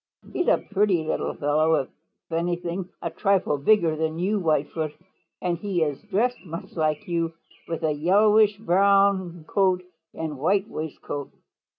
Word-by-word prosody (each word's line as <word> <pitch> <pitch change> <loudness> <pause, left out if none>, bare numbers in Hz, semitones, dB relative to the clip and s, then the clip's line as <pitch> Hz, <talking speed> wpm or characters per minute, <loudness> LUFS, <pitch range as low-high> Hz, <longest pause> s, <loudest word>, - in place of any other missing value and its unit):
"He - - -4
is - - -1
a - - +5
pretty 195 -4 +2
little 155 - -2
fellow, 155 +2 +2
if 135 - -1 0.4
anything 175 +2 -2
a - - -2
trifle 195 -8 +1
bigger 165 0 +3
than 160 0 -2
you, 200 +5 0
Whitefoot, 155 -2 0 0.5
and 175 -2 0
he 190 -4 0
is 145 -3 -3
dressed 220 +5 -1
much 165 -1 -8
like 155 +3 -1
you 165 -1 -1 0.3
with 165 - -4
a 155 - +2
yellowish 205 +6 +4
brown 195 -3 +2
coat 185 -2 +2 0.3
and 155 -4 -4
white 195 +7 +2
waistcoat. 150 -5 -6
175 Hz, 150 wpm, -25 LUFS, 160-200 Hz, 0.5 s, a